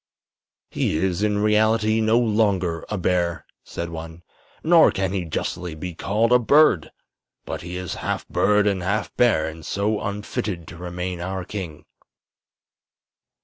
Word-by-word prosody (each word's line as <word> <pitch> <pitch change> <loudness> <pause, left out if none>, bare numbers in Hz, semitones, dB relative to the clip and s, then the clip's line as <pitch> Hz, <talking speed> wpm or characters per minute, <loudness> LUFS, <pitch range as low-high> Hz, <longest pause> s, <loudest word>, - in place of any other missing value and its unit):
"He - - 0
is, 90 +2 0
in 105 -1 +1
reality, 110 +1 +3
no 110 +1 +3
longer 100 -7 +1
a 105 - -2
bear," 85 -2 0 0.2
said 85 0 -5
one; 80 +1 -8 0.4
"nor 165 0 +6
can 95 -1 -2
he 95 -3 -2
justly 85 +1 -4
be 90 +3 -6
called 105 +7 0
a 125 - +7
bird. 135 - +4 0.5
But - - -5
he 90 +1 -6
is 90 -1 -4
half - - -3
bird 105 0 +2
and 100 -3 +1
half 100 +2 -2
bear, 120 -10 +3
and 80 0 -8
so 105 +5 -1
unfitted 100 -3 -4
to 85 - -10
remain 90 0 -5
our 95 0 -4
king." 90 -8 -7
95 Hz, 145 wpm, -23 LUFS, 85-105 Hz, 0.5 s, a